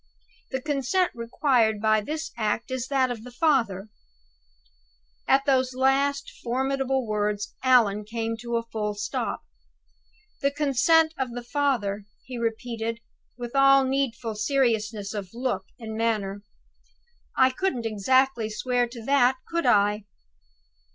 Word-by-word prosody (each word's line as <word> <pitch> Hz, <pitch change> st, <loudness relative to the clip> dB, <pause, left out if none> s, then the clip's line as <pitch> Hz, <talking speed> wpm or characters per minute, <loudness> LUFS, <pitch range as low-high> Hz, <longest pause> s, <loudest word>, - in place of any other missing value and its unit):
The 265 Hz, -, -2 dB
consent 300 Hz, +5 st, +1 dB
required 230 Hz, -2 st, +1 dB
by 215 Hz, 0 st, +3 dB
this 305 Hz, +9 st, -4 dB
act 225 Hz, +2 st, -2 dB
is 260 Hz, -1 st, -2 dB
that 260 Hz, -2 st, +1 dB
of 225 Hz, -3 st, -6 dB
the 250 Hz, -, -9 dB
father 240 Hz, -, +1 dB, 0.7 s
'" -, -, -37 dB, 0.6 s
At 275 Hz, +1 st, +4 dB
those 260 Hz, -2 st, +2 dB
last 275 Hz, +2 st, +1 dB
formidable 265 Hz, +1 st, 0 dB
words 210 Hz, -1 st, -2 dB
Allan 230 Hz, -6 st, +4 dB
came 225 Hz, +1 st, -3 dB
to 235 Hz, 0 st, -4 dB
a 230 Hz, -, 0 dB
full 210 Hz, -2 st, -3 dB
stop. 205 Hz, -, -3 dB, 1.0 s
"The 280 Hz, -, +3 dB
consent 300 Hz, +3 st, +3 dB
of 255 Hz, -3 st, -2 dB
the 245 Hz, 0 st, -5 dB
father," 235 Hz, -7 st, -1 dB, 0.2 s
he 250 Hz, -2 st, -6 dB
repeated, 230 Hz, 0 st, -3 dB, 0.4 s
with 240 Hz, +1 st, -7 dB
all 275 Hz, 0 st, +6 dB
needful 260 Hz, -4 st, -1 dB
seriousness 215 Hz, -3 st, 0 dB
of 205 Hz, 0 st, -6 dB
look 240 Hz, -6 st, -2 dB
and 220 Hz, -2 st, -7 dB
manner. 210 Hz, -3 st, -1 dB, 1.0 s
"I 260 Hz, 0 st, +5 dB
couldn't 255 Hz, -5 st, -2 dB
exactly 230 Hz, +2 st, +2 dB
swear 245 Hz, +3 st, 0 dB
to 235 Hz, -2 st, -10 dB
that, 265 Hz, -1 st, +4 dB
could 335 Hz, 0 st, -1 dB
I?" 205 Hz, 0 st, +3 dB
240 Hz, 130 wpm, -26 LUFS, 215-270 Hz, 1.0 s, all